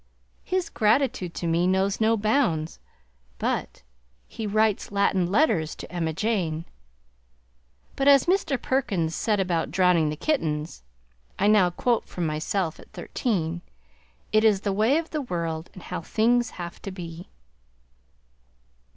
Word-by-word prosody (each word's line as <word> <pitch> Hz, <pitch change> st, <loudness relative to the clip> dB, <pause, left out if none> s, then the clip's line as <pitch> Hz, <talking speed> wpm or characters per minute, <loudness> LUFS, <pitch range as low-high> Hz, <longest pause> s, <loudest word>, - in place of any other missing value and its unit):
His 370 Hz, -1 st, -2 dB
gratitude 215 Hz, -5 st, +1 dB
to -, -, -4 dB
me 170 Hz, +2 st, +2 dB
knows 190 Hz, +2 st, +1 dB
no 225 Hz, +1 st, +3 dB
bounds, 210 Hz, -, 0 dB, 0.6 s
but -, -, -3 dB, 0.4 s
he 220 Hz, -, -5 dB
writes 215 Hz, 0 st, +1 dB
Latin 195 Hz, -3 st, +2 dB
letters 195 Hz, -, +2 dB
to -, -, -10 dB
Emma 170 Hz, -3 st, -1 dB
Jane! 170 Hz, -4 st, -1 dB, 1.3 s
But 275 Hz, -, 0 dB
as 275 Hz, -2 st, +7 dB
Mr. 350 Hz, -8 st, +1 dB
Perkins 200 Hz, -12 st, 0 dB
said 210 Hz, +1 st, 0 dB
about 175 Hz, -4 st, 0 dB
drowning 175 Hz, -2 st, +3 dB
the 150 Hz, -, -3 dB
kittens 155 Hz, -, -2 dB, 0.6 s
(I 200 Hz, -, +1 dB
now 205 Hz, -4 st, +5 dB
quote 230 Hz, +6 st, 0 dB
from 175 Hz, -, -3 dB
myself 160 Hz, +2 st, -2 dB
at -, -, -16 dB
thirteen), 175 Hz, -, -2 dB, 0.7 s
"It 215 Hz, 0 st, +4 dB
is 210 Hz, -3 st, +4 dB
the 200 Hz, -2 st, -1 dB
way 220 Hz, +8 st, +3 dB
of 325 Hz, 0 st, -3 dB
the 305 Hz, -, -2 dB
world 170 Hz, -, -3 dB
and 185 Hz, -, -11 dB
how -, -, -5 dB
things 235 Hz, +6 st, +2 dB
have 175 Hz, -1 st, -7 dB
to -, -, -6 dB
be!" 175 Hz, -2 st, -8 dB
195 Hz, 140 wpm, -25 LUFS, 170-225 Hz, 1.3 s, as